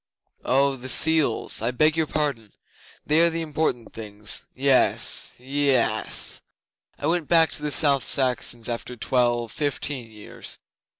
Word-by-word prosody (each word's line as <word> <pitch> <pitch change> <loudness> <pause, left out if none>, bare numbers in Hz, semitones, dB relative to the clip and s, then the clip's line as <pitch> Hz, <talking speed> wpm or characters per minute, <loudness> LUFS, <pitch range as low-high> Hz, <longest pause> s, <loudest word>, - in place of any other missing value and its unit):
'Oh, 135 +1 +1
the 130 +1 -7
seals! 155 -8 +2
I 115 - +1
beg 155 +5 +2
your 160 -1 0
pardon. 140 -10 -3 0.5
They 155 +2 +3
are 170 - +4
the 165 0 -4
important 150 -6 -3
things. 105 -1 -2
Yes 135 0 +3
yess! 135 -1 0 0.6
I - - -6
went 165 -1 -1
back 165 -2 +4
to - - -5
the 150 - -3
South 140 -2 +3
Saxons 125 -3 0
after 120 +1 -5
twelve 120 -1 0
fifteen 145 -4 -3
years. 105 -1 -8
135 Hz, 135 wpm, -23 LUFS, 120-150 Hz, 0.6 s, are